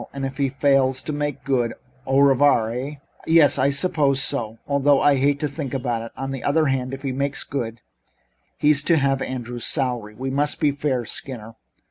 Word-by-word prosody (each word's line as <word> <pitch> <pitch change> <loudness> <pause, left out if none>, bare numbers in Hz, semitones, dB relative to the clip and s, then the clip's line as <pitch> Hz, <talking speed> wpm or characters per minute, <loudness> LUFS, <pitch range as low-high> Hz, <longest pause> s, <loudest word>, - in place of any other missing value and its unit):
"And 135 -1 -4
if 135 0 -6
he 140 -2 +1
fails 135 -1 +2
to 155 - -4
make 145 -2 -3
good 125 -5 0 0.3
au 135 +1 +3
revoir, 135 -5 +4
eh?" 130 +5 -4 0.3
"Yes, 160 -3 +5
I 135 +2 +3
suppose 140 -2 +1
so, 120 -5 -2
although 140 0 +3
I 145 -1 +4
hate 140 +2 +2
to 150 - +1
think 140 -2 -5
about 120 -3 -2
it. 115 - -8
On 135 +1 -4
the 135 -2 -5
other 155 +2 +2
hand, 130 -2 -1
if 135 +1 -7
he 135 - -1
makes 140 +2 -1
good 115 -4 -5 0.8
he's 150 -1 +3
to 165 - +4
have 135 -2 +1
Andrews' 120 -2 -5
salary. 120 -7 -1
We 130 +4 -4
must 145 +2 -1
be 150 -2 +3
fair, 140 -4 -2
Skinner. 115 -2 -6
135 Hz, 195 wpm, -22 LUFS, 125-145 Hz, 0.8 s, Yes